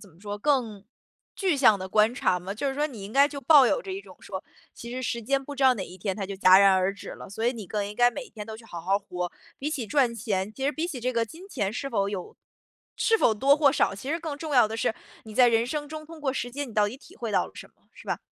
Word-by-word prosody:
怎 200 Hz, -, -15 dB
么 160 Hz, -, -23 dB
说， 205 Hz, 0 st, -5 dB
更 225 Hz, -5 st, 0 dB, 0.5 s
具 370 Hz, -6 st, +1 dB
象 235 Hz, -7 st, +5 dB
的 185 Hz, 0 st, -6 dB
观 215 Hz, +4 st, +4 dB
察 180 Hz, -6 st, +1 dB
嘛， 185 Hz, +2 st, -6 dB
就 250 Hz, +7 st, -2 dB
是 270 Hz, -, -2 dB
说 295 Hz, +2 st, +1 dB
你 225 Hz, -8 st, -9 dB
应 205 Hz, -, -9 dB
该 280 Hz, +1 st, +5 dB
就 285 Hz, -1 st, -7 dB
抱 275 Hz, 0 st, +7 dB
有 -, -, +1 dB
着 390 Hz, -6 st, -6 dB
一 385 Hz, -, -4 dB
种 -, -, -15 dB
说， -, -, -6 dB, 0.3 s
其 235 Hz, -, -9 dB
实 255 Hz, +1 st, -4 dB
时 235 Hz, -1 st, -2 dB
间 275 Hz, +4 st, 0 dB
不 285 Hz, -, -7 dB
知 275 Hz, -, -3 dB
道 260 Hz, -1 st, +6 dB
哪 190 Hz, -4 st, -4 dB
一 185 Hz, -, -11 dB
天 190 Hz, 0 st, -3 dB
它 200 Hz, -3 st, -3 dB
就 195 Hz, -, -5 dB
戛 185 Hz, -1 st, +7 dB
然 195 Hz, -1 st, +6 dB
而 185 Hz, +1 st, +2 dB
止 200 Hz, -, -10 dB
了。 -, -, -9 dB
所 220 Hz, +4 st, -2 dB
以 245 Hz, -, +3 dB
你 220 Hz, -6 st, -8 dB
更 205 Hz, +1 st, -2 dB
应 205 Hz, -, -7 dB
该 245 Hz, +2 st, +5 dB
每 275 Hz, +2 st, -6 dB
一 -, -, -17 dB
天 210 Hz, -2 st, -8 dB
都 220 Hz, -, -7 dB
去 225 Hz, -, -15 dB
好 175 Hz, -6 st, -8 dB
好 195 Hz, +4 st, +1 dB
活， 180 Hz, -3 st, -5 dB, 0.3 s
比 295 Hz, +3 st, -3 dB
起 260 Hz, -8 st, -3 dB
赚 255 Hz, 0 st, +2 dB
钱 205 Hz, -3 st, -2 dB
其 265 Hz, +4 st, -5 dB
实 285 Hz, -, +2 dB
比 320 Hz, +4 st, -2 dB
起 295 Hz, -8 st, -5 dB
这 255 Hz, +2 st, -1 dB
个 230 Hz, -1 st, +1 dB
金 335 Hz, -, -12 dB
钱 205 Hz, -, -2 dB
是 275 Hz, +3 st, -4 dB
否 200 Hz, -6 st, 0 dB
有 195 Hz, -3 st, -6 dB, 0.6 s
是 450 Hz, -, +3 dB
否 225 Hz, -, +4 dB
多 275 Hz, +6 st, +4 dB
或 295 Hz, -2 st, +5 dB
少， -, -, +2 dB
其 255 Hz, +9 st, -6 dB
实 330 Hz, -, 0 dB
更 310 Hz, -3 st, -4 dB
重 310 Hz, -2 st, -4 dB
要 245 Hz, -4 st, +6 dB
的 220 Hz, +1 st, -5 dB
是， 225 Hz, -, 0 dB, 0.3 s
你 215 Hz, -1 st, -10 dB
在 250 Hz, 0 st, +6 dB
人 230 Hz, 0 st, +3 dB
生 295 Hz, +3 st, -3 dB
中 310 Hz, 0 st, -7 dB
通 325 Hz, 0 st, -11 dB
过 275 Hz, -3 st, 0 dB
时 245 Hz, -2 st, -3 dB
间 280 Hz, +2 st, -4 dB
你 225 Hz, -, -12 dB
到 210 Hz, -1 st, +3 dB
底 240 Hz, -, -8 dB
体 -, -, -17 dB
会 230 Hz, -2 st, -4 dB
到 -, -, +3 dB
了 -, -, -15 dB
什 -, -, -10 dB
么， -, -, -36 dB
是 -, -, -15 dB
吧？ -, -, -1 dB
235 Hz, 330 characters per minute, -26 LUFS, 205-280 Hz, 0.6 s, 抱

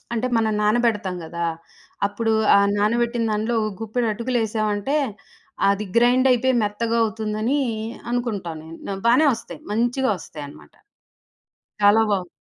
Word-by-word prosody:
అంటే 235 Hz, +2 st, -1 dB
మనం 220 Hz, -1 st, +1 dB
నానబెడతాం 210 Hz, -4 st, +1 dB
గదా! 170 Hz, +1 st, -3 dB, 0.6 s
అప్పుడు 225 Hz, +2 st, -1 dB, 0.2 s
ఆ -, -, +6 dB, 0.2 s
నానబెట్టిన 235 Hz, +2 st, +1 dB
దాంట్లో 215 Hz, +3 st, -1 dB
ఒక 215 Hz, -, -2 dB
గుప్పెడు 230 Hz, +2 st, -1 dB
అటుకులేసామంటే 220 Hz, +1 st, -1 dB, 0.7 s
అది 200 Hz, +1 st, -1 dB
గ్రైండైతే 250 Hz, +1 st, +4 dB
మెత్తగా 230 Hz, +3 st, -1 dB
అవుతుందని 220 Hz, +5 st, -1 dB, 0.5 s
అనుకుంటా 230 Hz, -8 st, -2 dB
నేను. 165 Hz, +1 st, -10 dB
న 195 Hz, -, -3 dB
బానే 250 Hz, +7 st, +5 dB
ఒస్తాయి. 225 Hz, -, -10 dB
మంచిగొస్తాయి 225 Hz, -, -1 dB
అన్నమాట. 75 Hz, -, -15 dB, 1.1 s
చాలా 205 Hz, +2 st, +6 dB
బావు 185 Hz, -3 st, -1 dB
220 Hz, 115 wpm, -22 LUFS, 205-240 Hz, 1.1 s, ఆ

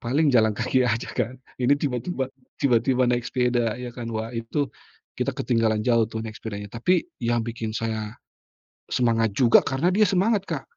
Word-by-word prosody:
paling 145 Hz, +6 st, +2 dB
jalan 110 Hz, -3 st, +4 dB
kaki 130 Hz, -1 st, +2 dB
aja 115 Hz, +1 st, -1 dB
kan. 125 Hz, 0 st, -2 dB, 0.3 s
Ini 125 Hz, +3 st, +4 dB
tiba-tiba 135 Hz, 0 st, -2 dB, 0.3 s
tiba-tiba 125 Hz, 0 st, +3 dB
naik 120 Hz, -1 st, 0 dB
sepeda 120 Hz, -3 st, +1 dB
ya 125 Hz, -1 st, -6 dB
kan 120 Hz, -1 st, -6 dB
wah 110 Hz, 0 st, -3 dB
itu, 120 Hz, +5 st, -2 dB, 0.5 s
kita -, -, 0 dB
ketinggalan 115 Hz, -3 st, +1 dB
jauh 115 Hz, -1 st, +4 dB
tuh 110 Hz, -1 st, -5 dB
naik 110 Hz, -1 st, -7 dB
sepedanya. 105 Hz, -2 st, -6 dB
Tapi, 175 Hz, +11 st, +2 dB, 0.2 s
yang 120 Hz, 0 st, +1 dB
bikin 115 Hz, -1 st, -4 dB
saya, 110 Hz, -1 st, -3 dB, 0.7 s
semangat 115 Hz, -3 st, +1 dB
juga 120 Hz, -3 st, +6 dB
karena 140 Hz, +6 st, +1 dB
dia 210 Hz, +2 st, +5 dB
semangat 200 Hz, +2 st, +2 dB
Kak, 155 Hz, -7 st, -4 dB
120 Hz, 165 wpm, -24 LUFS, 115-130 Hz, 0.7 s, juga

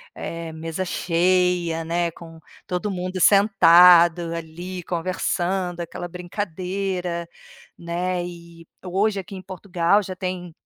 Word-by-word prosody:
eh, 165 Hz, -1 st, -6 dB
mesa 165 Hz, +3 st, -4 dB
cheia, 175 Hz, -1 st, +1 dB
né, 170 Hz, 0 st, 0 dB
com 165 Hz, -1 st, -13 dB, 0.3 s
todo 180 Hz, +3 st, -2 dB
mundo 185 Hz, 0 st, -4 dB
sentado 175 Hz, -4 st, +6 dB
ali 175 Hz, +2 st, -7 dB
conversando, 180 Hz, +1 st, -2 dB
aquela 175 Hz, +1 st, -6 dB
brincadeira, 180 Hz, -1 st, -4 dB, 0.5 s
né. 175 Hz, +1 st, -2 dB
E 170 Hz, -1 st, -11 dB, 0.2 s
hoje, 200 Hz, +3 st, 0 dB
aqui 195 Hz, +1 st, -8 dB
em 185 Hz, -, -7 dB
Portugal, 185 Hz, +1 st, +1 dB
já 185 Hz, 0 st, -6 dB
tem 180 Hz, -2 st, -5 dB
175 Hz, 110 wpm, -23 LUFS, 170-185 Hz, 0.5 s, sentado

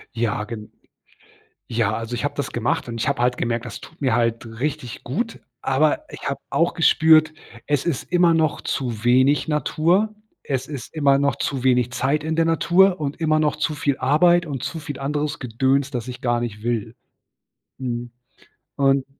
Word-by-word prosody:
Ja, 115 Hz, -2 st, -1 dB
gen 105 Hz, -1 st, -8 dB, 1.0 s
ja, 115 Hz, -2 st, 0 dB
also, 115 Hz, +1 st, -5 dB
ich 120 Hz, -, -3 dB
habe 145 Hz, -, -1 dB
das 145 Hz, -, -3 dB
gemacht 120 Hz, +1 st, -1 dB
und 115 Hz, -1 st, -5 dB
ich -, -, 0 dB
habe -, -, 0 dB
halt 125 Hz, 0 st, +2 dB
gemerkt, 120 Hz, 0 st, -1 dB
das 115 Hz, -, -7 dB
tut 165 Hz, -, -14 dB
mir 130 Hz, -4 st, +2 dB
halt 115 Hz, -1 st, 0 dB
richtig 130 Hz, -4 st, -3 dB
gut. 225 Hz, -, -3 dB, 0.2 s
Aber 145 Hz, +3 st, +2 dB
ich -, -, -6 dB
habe 140 Hz, -1 st, -2 dB
auch 170 Hz, +1 st, +1 dB
gespürt, 160 Hz, -1 st, +5 dB, 0.3 s
es 145 Hz, -2 st, 0 dB
ist 170 Hz, -7 st, -1 dB
immer 175 Hz, -1 st, +5 dB
noch 160 Hz, -2 st, +1 dB
zu 120 Hz, -5 st, -3 dB
wenig 130 Hz, +5 st, +4 dB
Natur. 170 Hz, +7 st, +1 dB, 0.3 s
Es 130 Hz, -3 st, -2 dB
ist 140 Hz, -3 st, -7 dB
immer 140 Hz, -3 st, +3 dB
noch 140 Hz, 0 st, +2 dB
zu 135 Hz, -3 st, -3 dB
wenig 125 Hz, -2 st, +3 dB
Zeit 140 Hz, +4 st, 0 dB
in 160 Hz, +1 st, -2 dB
der 165 Hz, -, +3 dB
Natur 175 Hz, +3 st, +3 dB
und 145 Hz, +1 st, -3 dB
immer 155 Hz, -1 st, +2 dB
noch 150 Hz, -1 st, +1 dB
zu 150 Hz, +1 st, -1 dB
viel 145 Hz, -2 st, 0 dB
Arbeit 170 Hz, +6 st, +4 dB
und 135 Hz, -5 st, -5 dB
zu 165 Hz, -, -4 dB
viel 145 Hz, -3 st, -7 dB
anderes 145 Hz, +2 st, -2 dB
Gedöns, 130 Hz, +3 st, +1 dB
das 120 Hz, -4 st, -4 dB
ich 125 Hz, -1 st, -7 dB
gar 120 Hz, -1 st, +1 dB
nicht 110 Hz, -3 st, -5 dB
will. 115 Hz, -2 st, -2 dB, 0.9 s
Mhm 120 Hz, -2 st, -4 dB, 0.6 s
und 135 Hz, -1 st, +2 dB
140 Hz, 185 wpm, -22 LUFS, 120-155 Hz, 1.0 s, gespürt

